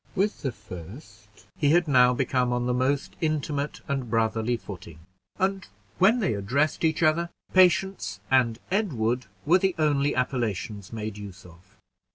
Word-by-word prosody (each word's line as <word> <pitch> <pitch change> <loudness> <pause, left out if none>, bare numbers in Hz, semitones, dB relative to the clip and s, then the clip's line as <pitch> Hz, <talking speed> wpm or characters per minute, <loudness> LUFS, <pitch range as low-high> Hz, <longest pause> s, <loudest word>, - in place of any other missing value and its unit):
With 205 +2 0
the 135 - -1
first 105 - -12 0.3
he 145 - +3
had 170 +2 +4
now 125 -3 +5
become 125 -1 0
on 125 0 0
the 125 - +1
most 135 +3 0
intimate 150 -2 -2
and 135 -5 -2
brotherly 115 +1 0
footing; 85 -7 -10 0.4
and 190 0 -1 0.3
when 205 +6 +5
they 200 - 0
addressed 135 +12 0
each 160 0 +1
other, 165 +2 +2 0.2
Patience 185 - +3
and 120 -4 +3
Edward 125 - 0 0.2
were 175 +5 +5
the 190 -1 +1
only 145 -2 +1
appellations 110 -6 -2
made 110 -2 -5
use 100 -2 -10
of. 90 +4 -18
130 Hz, 150 wpm, -26 LUFS, 110-160 Hz, 0.4 s, now